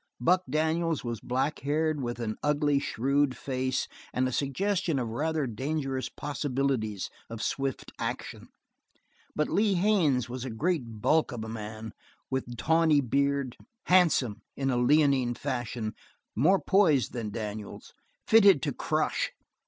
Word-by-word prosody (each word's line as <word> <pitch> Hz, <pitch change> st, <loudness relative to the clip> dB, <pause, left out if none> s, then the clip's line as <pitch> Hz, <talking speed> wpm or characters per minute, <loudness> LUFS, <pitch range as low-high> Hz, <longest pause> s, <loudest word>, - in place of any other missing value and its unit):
Buck 180 Hz, +9 st, +3 dB
Daniels 160 Hz, +2 st, 0 dB
was 120 Hz, -3 st, -3 dB
black 130 Hz, +6 st, -1 dB
haired, 150 Hz, +2 st, 0 dB
with 120 Hz, -1 st, -4 dB
an 110 Hz, -2 st, -2 dB
ugly, 145 Hz, -1 st, +2 dB
shrewd 140 Hz, +1 st, 0 dB
face 130 Hz, -1 st, -2 dB, 0.2 s
and 130 Hz, +1 st, +1 dB
a -, -, -2 dB
suggestion 165 Hz, +5 st, 0 dB
of 120 Hz, -3 st, -2 dB
rather 155 Hz, +5 st, -1 dB
dangerous 135 Hz, +2 st, -2 dB
possibilities 135 Hz, -8 st, -2 dB, 0.2 s
of 115 Hz, -1 st, -5 dB
swift 135 Hz, -2 st, -2 dB
action; -, -, -4 dB, 0.9 s
but 150 Hz, -, +1 dB
Lee 205 Hz, -1 st, +2 dB
Haines 175 Hz, -, +2 dB
was 125 Hz, 0 st, -5 dB
a 130 Hz, -, -4 dB
great 120 Hz, -3 st, -2 dB
bulk 155 Hz, -2 st, +3 dB
of 120 Hz, -3 st, -5 dB
a -, -, -6 dB
man, 110 Hz, 0 st, -6 dB, 0.4 s
with 125 Hz, -2 st, -3 dB
tawny 160 Hz, +6 st, +3 dB
beard, 140 Hz, 0 st, 0 dB, 0.3 s
handsome, 165 Hz, -, +3 dB, 0.2 s
in 135 Hz, -1 st, 0 dB
a 125 Hz, -, +1 dB
leonine 130 Hz, -2 st, +3 dB
fashion, 120 Hz, -5 st, -3 dB, 0.4 s
more 180 Hz, -, +4 dB
poised 165 Hz, -10 st, +3 dB
than 115 Hz, -4 st, -3 dB
Daniels, 105 Hz, -1 st, -6 dB, 0.3 s
fitted 200 Hz, -, +6 dB
to -, -, -1 dB
crush. -, -, -1 dB
135 Hz, 135 wpm, -28 LUFS, 120-155 Hz, 0.9 s, fitted